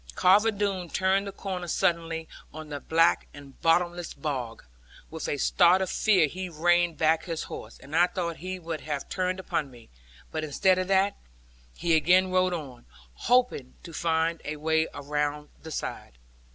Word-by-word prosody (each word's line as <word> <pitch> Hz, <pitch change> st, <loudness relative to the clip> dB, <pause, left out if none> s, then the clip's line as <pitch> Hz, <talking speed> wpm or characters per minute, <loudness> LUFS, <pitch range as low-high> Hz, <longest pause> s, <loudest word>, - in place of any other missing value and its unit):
Carver 205 Hz, +5 st, +5 dB
Doone 200 Hz, -4 st, -2 dB
turned 190 Hz, +3 st, +1 dB
the -, -, -4 dB
corner 185 Hz, -3 st, -5 dB
suddenly 165 Hz, -1 st, 0 dB, 0.2 s
on 155 Hz, 0 st, -9 dB
the 145 Hz, -1 st, -5 dB
black 165 Hz, +3 st, +2 dB
and 140 Hz, -2 st, -14 dB
bottomless 175 Hz, +1 st, +1 dB
bog; 125 Hz, -7 st, -4 dB, 0.5 s
with 160 Hz, -1 st, -5 dB
a 145 Hz, -, -1 dB
start 175 Hz, +6 st, +4 dB
of 190 Hz, -1 st, -2 dB
fear 195 Hz, -7 st, +4 dB
he 185 Hz, +5 st, -5 dB
reined 175 Hz, +1 st, +2 dB
back 160 Hz, 0 st, +2 dB
his 165 Hz, -3 st, -3 dB
horse, -, -, -9 dB
and 140 Hz, +3 st, -9 dB
I 175 Hz, +2 st, +5 dB
thought 170 Hz, -3 st, -3 dB
he 185 Hz, +2 st, -5 dB
would 165 Hz, -3 st, -5 dB
have 145 Hz, -2 st, -4 dB
turned 185 Hz, 0 st, -1 dB
upon 155 Hz, -5 st, -2 dB
me. 120 Hz, -3 st, -16 dB, 0.4 s
But 155 Hz, -1 st, -3 dB
instead 185 Hz, +5 st, +2 dB
of 185 Hz, -, -2 dB
that, 195 Hz, +1 st, +2 dB, 0.6 s
he 170 Hz, -, +1 dB
again 180 Hz, +4 st, +4 dB
rode 185 Hz, 0 st, +3 dB
on; 135 Hz, -, -9 dB, 0.3 s
hoping 245 Hz, -, +1 dB
to 170 Hz, -, -10 dB
find 165 Hz, 0 st, 0 dB
a 150 Hz, -, -4 dB
way 160 Hz, +1 st, +1 dB
round 150 Hz, +1 st, -3 dB
the 160 Hz, -, -9 dB
side. 60 Hz, -, -6 dB
165 Hz, 170 wpm, -27 LUFS, 155-185 Hz, 0.6 s, Carver